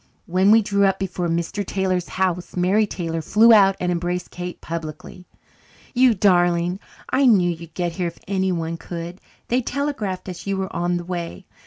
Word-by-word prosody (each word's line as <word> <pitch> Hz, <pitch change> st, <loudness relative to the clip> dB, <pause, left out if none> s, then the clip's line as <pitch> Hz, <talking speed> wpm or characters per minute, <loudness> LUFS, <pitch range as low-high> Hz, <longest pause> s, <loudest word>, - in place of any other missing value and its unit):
When 185 Hz, +3 st, +2 dB
we 220 Hz, +1 st, +6 dB
drew 200 Hz, 0 st, +2 dB
up 195 Hz, -, +1 dB
before 180 Hz, -2 st, -3 dB
Mr. 170 Hz, +5 st, -2 dB
Taylor's 185 Hz, -2 st, -1 dB
house 180 Hz, -1 st, -2 dB
Mary 195 Hz, +4 st, +3 dB
Taylor 165 Hz, -4 st, -3 dB
flew 220 Hz, +8 st, +5 dB
out 195 Hz, -3 st, +6 dB
and 180 Hz, 0 st, 0 dB
embraced 175 Hz, +1 st, -2 dB
Kate 180 Hz, 0 st, -6 dB
publicly. 165 Hz, +2 st, -7 dB, 0.7 s
"You 250 Hz, -2 st, +4 dB
darling! 175 Hz, -2 st, +2 dB, 0.3 s
I 270 Hz, 0 st, +4 dB
knew 185 Hz, -7 st, +4 dB
you'd 165 Hz, -1 st, -9 dB
get 175 Hz, -2 st, -1 dB
here 175 Hz, +1 st, -2 dB
if 170 Hz, -, -7 dB
anyone 180 Hz, -4 st, -1 dB
could. 170 Hz, +2 st, -7 dB, 0.3 s
They 250 Hz, +2 st, +2 dB
telegraphed 230 Hz, -10 st, -3 dB
us 180 Hz, +1 st, -7 dB
you 195 Hz, 0 st, 0 dB
were 190 Hz, 0 st, -4 dB
on 175 Hz, +1 st, 0 dB
the 175 Hz, -, -6 dB
way. 175 Hz, +1 st, -5 dB
180 Hz, 175 wpm, -22 LUFS, 175-195 Hz, 0.7 s, we